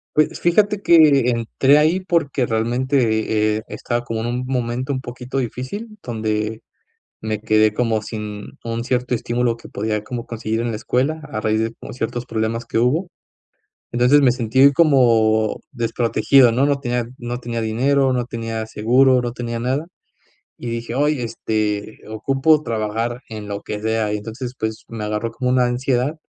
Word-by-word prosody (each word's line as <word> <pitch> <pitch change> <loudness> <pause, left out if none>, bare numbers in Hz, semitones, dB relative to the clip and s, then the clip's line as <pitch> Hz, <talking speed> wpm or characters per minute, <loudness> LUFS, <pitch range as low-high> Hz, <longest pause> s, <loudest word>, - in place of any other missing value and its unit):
Pues, 155 0 +2
fíjate 205 +4 +2
que 145 -7 +6
entré 130 +5 +3
ahí 160 +5 +3
porque 165 -8 0
realmente, 110 -2 +1
eh, 110 - -6
estaba 120 -1 -3
como 115 -2 -4
en 115 - -2
un 125 +1 -2
momento 125 +1 -2
un 130 - -3
poquito 125 +1 -5
difícil, 135 - -5
donde 110 -1 -2 0.6
me 110 -1 -2
quedé 110 -1 +3
como 115 -2 +1
sin 105 -1 -6 0.2
un 115 0 -3
cierto 125 0 -1
estímulo 120 0 -1
que - - -13
podía 105 0 -2
como 120 +2 -5
conseguir 115 0 -3
en 120 - -1
la 110 - -3
escuela, 135 +8 -1
a 110 -6 -4
raíz 110 0 +1
de 115 +1 -2
como - - -9
ciertos 120 0 -3
problemas 115 +1 -2
que 115 - -2
hubo, 145 +10 +1 0.8
entonces, 125 +4 +5
me 130 -3 +5
sentí 130 +3 +4
como 115 -8 +3
desprotegido, 120 +1 +3
¿no?, 130 +5 +2
no 140 -1 +1
tenía 120 -2 -1
no 120 0 -4
tenía 120 -1 -4
dinero, 130 +5 +2
no 125 -1 0
tenía 115 -2 -4
seguro, 125 +4 +3
no 120 - -2
tenía 120 -1 -4
nada, 130 +6 -1 0.7
y 120 - -6
dije: 115 0 -4
"Oye, 145 -2 +1
este, 110 -2 -2
ocupo 135 +7 +2
trabajar 115 +1 -2
en 105 -2 -7
lo 100 0 -5
que 105 - -5
sea", 110 -1 0
y 105 - -1
entonces, 115 +4 -6
pues, 110 0 -4
me 115 -2 -7
agarró 105 +2 -2
como 125 +2 -1
una 125 0 +3
ansiedad, 125 +3 0
120 Hz, 170 wpm, -20 LUFS, 110-130 Hz, 0.8 s, que